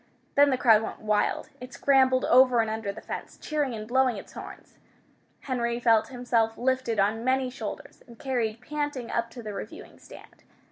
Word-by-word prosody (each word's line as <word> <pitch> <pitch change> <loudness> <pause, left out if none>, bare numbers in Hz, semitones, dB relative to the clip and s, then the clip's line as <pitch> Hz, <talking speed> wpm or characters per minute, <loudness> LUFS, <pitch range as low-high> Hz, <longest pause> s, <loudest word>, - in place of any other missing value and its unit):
Then 285 0 +5
the 260 - +1
crowd 225 -4 +5
went - - -6
wild. 210 -1 0
It 250 +1 -10
scrambled 260 -2 +3
over 255 -1 +5
and 225 -1 +1
under 220 -2 -3
the 200 - -10
fence, - - -7
cheering 295 -5 -2
and 215 -1 -7
blowing 255 -1 +2
its - - -11
horns. - - -11 0.6
Henry 235 -3 -2
felt 225 -2 +3
himself 240 -3 0
lifted 255 -3 0
on 215 +3 +1
many 260 0 +1
shoulders 265 - -8
and 235 -1 -14
carried 235 -4 -2
panting 290 -3 -4
up 235 0 -1
to 235 +1 -10
the 210 -1 -6
reviewing - - -9
stand. - - -15
240 Hz, 180 wpm, -27 LUFS, 225-260 Hz, 0.6 s, Then